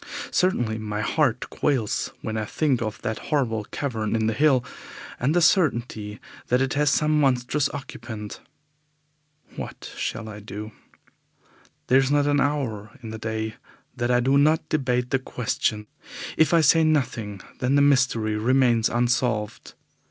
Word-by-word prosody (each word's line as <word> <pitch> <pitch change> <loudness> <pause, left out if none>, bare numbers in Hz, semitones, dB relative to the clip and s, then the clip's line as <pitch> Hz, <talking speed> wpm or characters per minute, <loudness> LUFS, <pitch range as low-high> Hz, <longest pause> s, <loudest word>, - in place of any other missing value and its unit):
Certainly 120 -12 +1
my 105 -1 -3
heart 125 -1 +1
quails 125 -8 0
when 110 - -3
I 110 - -1
think 130 +3 0
of 110 +1 -3
that 110 0 -2
horrible 115 -8 0
cavern 115 -6 -3
in 110 -1 +1
the 110 - +1
hill, 130 0 +3 0.5
and 140 +6 +1
the 175 - +4
certainty 120 - +1 0.3
that 125 - +2
it 135 0 0
has 150 0 +2
some 150 +1 +2
monstrous 135 +1 +1
occupant. 115 -6 -7 1.1
What - - -7
shall 115 -1 -4
I 105 -1 -8
do? 105 +1 -7 1.1
There 130 +2 +5
is 135 -1 +1
not 145 0 +3
an 145 -1 +2
hour 130 -6 -2
in 110 - -6
the 110 - -6
day 110 0 -3 0.4
that 120 -1 -1
I 125 0 +3
do 135 +3 +3
not 155 +2 +3
debate 125 -4 0
the 135 - +2
question. 110 -4 -2 0.5
If 160 -2 +3
I 170 -1 +5
say 160 +2 +5
nothing, 120 -10 0 0.2
then 130 +2 +1
the 140 - +5
mystery 125 -6 +2
remains 120 0 +3
unsolved. 120 -3 -1
125 Hz, 150 wpm, -24 LUFS, 110-145 Hz, 1.1 s, There